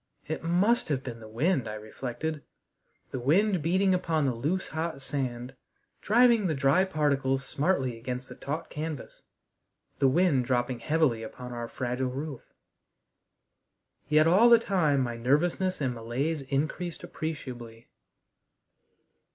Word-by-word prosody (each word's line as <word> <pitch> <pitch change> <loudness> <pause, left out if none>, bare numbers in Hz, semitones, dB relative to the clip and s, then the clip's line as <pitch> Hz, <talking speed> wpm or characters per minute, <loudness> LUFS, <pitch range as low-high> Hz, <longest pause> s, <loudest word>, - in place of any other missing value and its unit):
It 160 - -4
must 185 +8 +2
have 135 -3 -1
been 120 -3 -6
the 110 - -11
wind, 130 +3 0
I 105 - -5
reflected 130 +8 -5 0.7
the 130 - -3
wind 180 - +2
beating 185 +4 +2
upon 165 -4 +1
the 130 - +1
loose, 150 +11 -2
hot 160 -1 -3
sand, 130 -2 -4 0.5
driving 235 -2 +4
the 160 - 0
dry 140 +8 +3
particles 140 -6 0
smartly 135 -7 0
against 125 +2 -5
the - - -9
taut 155 +4 -5
canvas 155 -2 -6 0.8
the 135 - +4
wind 140 -3 +3
dropping 120 0 0
heavily 150 -4 +1
upon 125 +2 -8
our 120 -1 -4
fragile 125 +2 -2
roof. 140 +1 -5 1.7
Yet 155 0 +5
all 195 +9 +6
the 235 - +9
time 170 -11 +1
my 120 -2 -2
nervousness 170 +9 +1
and 130 -4 0
malaise 130 +7 -2
increased 150 +5 -3
appreciably. 120 -7 -6
140 Hz, 135 wpm, -28 LUFS, 125-165 Hz, 1.7 s, the